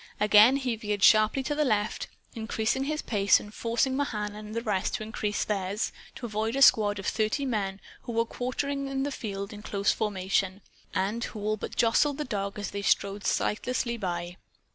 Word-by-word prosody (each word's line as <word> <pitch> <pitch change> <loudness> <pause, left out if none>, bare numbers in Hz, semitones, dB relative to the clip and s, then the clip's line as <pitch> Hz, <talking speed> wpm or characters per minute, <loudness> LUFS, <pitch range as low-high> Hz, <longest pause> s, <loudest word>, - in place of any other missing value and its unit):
Again 210 +4 +7
he 255 -4 -1
veered 210 -3 -3
sharply 215 +5 +5
to 295 - -1
the 300 +1 +1
left 215 -5 0 0.3
increasing 220 +3 -1
his 305 +1 -2
pace 200 -3 +4
and 210 - -11
forcing 235 +4 0
Mahan 210 -7 -2
and 215 +1 -8
the 230 - -2
rest 205 -4 0
to - - -4
increase 215 -1 -2
theirs 200 +1 -2 0.2
to 245 - -6
avoid 220 +1 -2
a 275 - +5
squad 205 -4 +5
of 195 - -6
thirty 220 +6 0
men 200 -6 -2 0.2
who 235 - -6
were 230 0 +2
quartering 275 +3 -2
the 285 - -2
field 200 -4 -5
in 210 - -9
close 200 -1 +1
formation, 195 -1 -1 0.3
and 205 +5 0
who 215 - -7
all 215 +1 0
but - - -7
jostled 260 +5 +3
the 300 - -3
dog 200 -4 -3
as 205 - -4
they 200 - -4
strode 200 0 +1
sightlessly 240 +2 0
by. 175 -4 -4
215 Hz, 185 wpm, -28 LUFS, 205-245 Hz, 0.3 s, Again